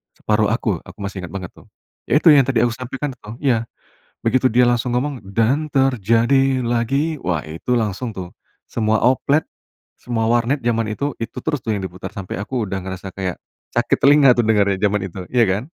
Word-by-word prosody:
Separuh 105 0 +1
Aku, 105 -7 -1
aku 90 - -15
masih 100 0 -5
ingat 85 - -12
banget 95 -2 -5
tuh. - - -19 0.4
Ya - - +2
itu 165 - +8
yang 140 -4 +6
tadi 120 -4 +2
aku 120 - +2
sampaikan 130 +4 -5
itu, 115 -5 -13
iya, 120 -4 +2 0.6
begitu 130 +3 +3
dia 125 +1 +4
langsung 120 0 +1
ngomong, 135 0 -2 0.2
dan 135 +7 +2
terjadi 130 0 +2
lagi 135 +6 0
wah 85 -7 -2
itu 80 +11 -2
langsung 115 +1 -2
tuh, 90 -2 -6 0.3
semua 110 -1 0
oplet, 140 +4 +3 0.6
semua 115 -2 -2
warnet 120 +4 +2
zaman 115 -2 +1
itu, 140 +7 -2
itu 115 - -5
terus 145 - -1
tuh 110 -2 -2
yang 95 - -4
diputar, 90 0 -6
sampe 95 -2 -6
aku 120 +3 -2
udah 95 -1 -4
ngerasa 95 +1 -7
kayak, 95 -2 -3 0.4
sakit - - +2
telinga 140 -2 +6
tuh 120 - +1
dengernya 100 -3 +3
zaman 105 0 +2
itu, 95 +1 -8
iya 120 -2 +4
kan? 95 +5 0
115 Hz, 190 wpm, -20 LUFS, 100-130 Hz, 0.6 s, itu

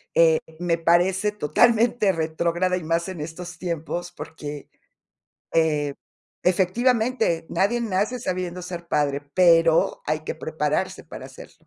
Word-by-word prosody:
eh, 160 -1 +5 0.2
me 170 -1 +1
parece 185 +5 +2
totalmente 220 +3 +3
retrógrada 170 +3 0
y 180 - -4
más 165 +3 0
en 180 -5 -6
estos 175 +3 -7
tiempos, 175 0 -4
porque, 150 -2 -8 0.8
eh, 150 -3 +1 0.5
efectivamente 220 -1 +1
nadie 235 +5 +1
nace 215 +3 -1
sabiendo 180 -3 -3
ser 175 -1 -7
padre, 145 -2 0
pero 165 -2 +4
hay 155 +1 0
que 155 - -5
prepararse 160 +2 -2
para - - -10
serlo. - - -15
175 Hz, 125 wpm, -24 LUFS, 160-190 Hz, 0.8 s, eh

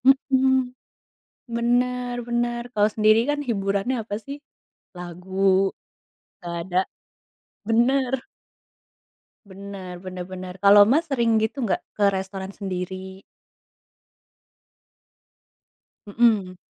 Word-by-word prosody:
Mhm. 265 -1 +3 0.8
Bener 245 +1 0
bener. 240 0 -1
Kalau 210 0 +4
sendiri 215 0 +5
kan, 290 0 0
hiburannya 200 +3 0
apa 205 -1 -5
sih? 280 +1 -6 0.6
Lagu, 190 +2 +1 0.7
nggak 170 -1 -6
ada. 180 +1 -1 0.9
Bener. 255 +2 +2 1.2
Bener 190 -2 -9
bener 185 -1 -6
bener. 185 -1 -8
Kalau 200 +2 +8
Mas 320 +4 +3
sering 235 -5 +2
gitu 220 +5 -1
enggak? 215 - +1 0.2
Ke 205 -1 +3
restoran 190 0 -5
sendiri? 190 0 -6 2.8
Mhm. 205 -4 +2
205 Hz, 90 wpm, -24 LUFS, 190-245 Hz, 2.8 s, Kalau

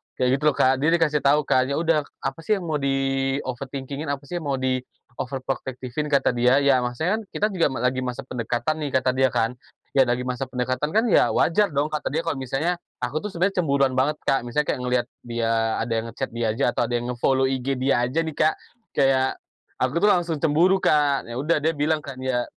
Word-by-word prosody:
Kayak 130 +1 +1
gitu - - -10
loh, 145 - +3
Kak. 130 0 +3
Dia 150 - +1
dikasih 150 -3 +2
tau 145 +2 +3
kan, 130 -2 +2
"Ya 140 - -1
udah, 160 -3 +1 0.2
apa 135 - -3
sih 210 +6 +1
yang 190 - -5
mau 155 -3 -1
di-overthinking-in? 135 +1 -2
Apa 140 0 -3
sih 175 +5 -4
yang 150 - -7
mau 140 - +1
di-overprotective-in?" 130 +1 -4
Kata 135 - +3
dia. 125 +3 +3
"Ya, 135 -2 +4
maksudnya 160 - -1
kan, - - -7
kita 210 - -1
juga 175 -5 +2
ma 130 -3 -4
lagi 130 +1 +1
masa 130 +1 -4
pendekatan, 125 +5 -2
nih," 135 -3 0
kata 130 - +3
dia 130 +1 +3
kan, 115 -1 0 0.4
"ya, 135 -2 +4
lagi 125 +1 0
masa 125 +1 -3
pendekatan 130 +5 -2
kan 220 - +4
ya - - +5
wajar 205 +5 +3
dong." 150 +2 +1
Kata 150 -2 -3
dia, 160 +4 -1
kalau 165 -5 -2
misalnya 150 +7 -1 0.2
aku 140 +6 -1
tuh 210 - -5
sebenarnya 185 +2 +1
cemburuan 140 -4 +2
banget, 150 +3 +2
Kak. 135 -3 +1
Misalnya 150 +5 0
kayak - - -3
ngeliat 125 0 0 0.2
dia 115 -1 -1 0.3
ada 115 - -6
yang 115 0 0
nge-chat 115 - -5
dia 115 -1 -1
aja 140 - -1
atau 120 - 0
ada 120 - -4
yang 120 +1 -2
nge-follow 130 +2 +1
IG 130 0 -3
dia 130 -1 +1
aja 165 +6 0
nih, 160 -2 -6
Kak, 155 0 +3 0.4
kayak 135 -1 +2 0.5
aku 130 +5 +1
tuh 205 - +3
langsung 170 -3 0
cemburu, 165 +6 +3
Kak. 145 -5 +2
Ya 120 - -7
udah, 160 +2 +2
dia 160 +2 0
bilang 150 +1 0
kan 130 -2 -8
ya 125 -2 0
135 Hz, 220 wpm, -24 LUFS, 125-150 Hz, 0.5 s, ya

